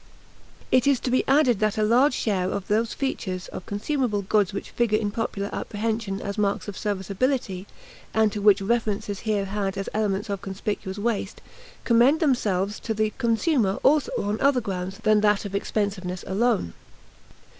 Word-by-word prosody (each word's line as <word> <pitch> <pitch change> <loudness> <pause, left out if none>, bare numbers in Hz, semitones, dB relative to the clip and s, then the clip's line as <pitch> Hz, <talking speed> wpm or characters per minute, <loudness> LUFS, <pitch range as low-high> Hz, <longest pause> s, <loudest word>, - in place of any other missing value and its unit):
It 255 +1 +4
is 275 -3 +4
to 250 - -2
be 255 - +3
added 265 -6 +4
that 215 -1 +1
a 215 - +2
large 250 +5 +4
share 190 -4 0
of 195 -1 -4
those 220 +2 +1
features 190 -9 -3
of - - -8
consumable 210 0 -1
goods 205 0 +2
which 200 - -6
figure 230 -3 +2
in 210 -2 -1
popular 205 -2 -3
apprehension 215 -2 -2
as 200 +1 -4
marks 200 0 0
of 205 - -5
serviceability, 200 +1 -2 0.4
and 220 -1 +3
to 205 - -4
which 200 -1 +5
reference 215 -1 0
is 200 -1 -3
here 210 -3 -1
had 195 -1 -2
as 195 - -3
elements 205 -1 -1
of 200 - -3
conspicuous 195 0 -4
waste, 210 -1 -2 0.4
commend 245 +6 +4
themselves 210 - +1
to 220 - -3
the 215 0 0
consumer 230 - +2
also 295 +1 +3
on 205 +2 -2
other 275 -2 +4
grounds 190 -3 -4
than 215 -1 +4
that 210 -1 +2
of 200 - -6
expensiveness 195 -3 -2
alone. 205 - 0
210 Hz, 170 wpm, -25 LUFS, 200-235 Hz, 0.4 s, which